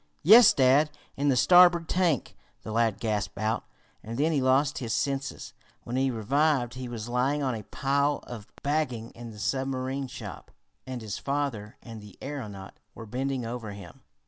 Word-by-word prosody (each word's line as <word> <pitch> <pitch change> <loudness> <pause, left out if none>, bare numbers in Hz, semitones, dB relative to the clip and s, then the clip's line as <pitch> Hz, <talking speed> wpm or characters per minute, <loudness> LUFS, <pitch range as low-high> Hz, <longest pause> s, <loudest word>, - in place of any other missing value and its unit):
"Yes, 215 +6 +9
dad! 135 +3 +4 0.3
In 145 +1 +1
the 135 - +3
starboard 175 +3 +6
tank!" 175 -8 0 0.3
the 110 - -6
lad 115 -2 +1
gasped 105 -4 -2
out, 110 +2 -1 0.4
and 115 +2 -7
then 155 +4 +2
he 145 -4 +1
lost 135 +3 +2
his 115 -4 -3
senses. 135 -6 -3 0.3
When 120 - -5
he 135 +1 +2
revived 130 +2 +1
he 130 -1 -6
was 115 -2 -6
lying 130 +4 0
on 130 -2 0
a 110 - -5
pile 140 +1 0
of 115 -4 -9 0.2
bagging 140 -6 -1
in 120 0 -10
the 110 - -11
submarine 130 +3 -2
shop, - - -9 0.4
and 125 -3 -5
his 105 -2 -5
father 135 -7 -3
and 115 -2 -9
the 105 -2 -14
aeronaut 105 -9 -7 0.2
were 115 - -9
bending 130 +2 -3
over 115 -3 -5
him. 100 -4 -12
130 Hz, 170 wpm, -27 LUFS, 115-140 Hz, 0.4 s, Yes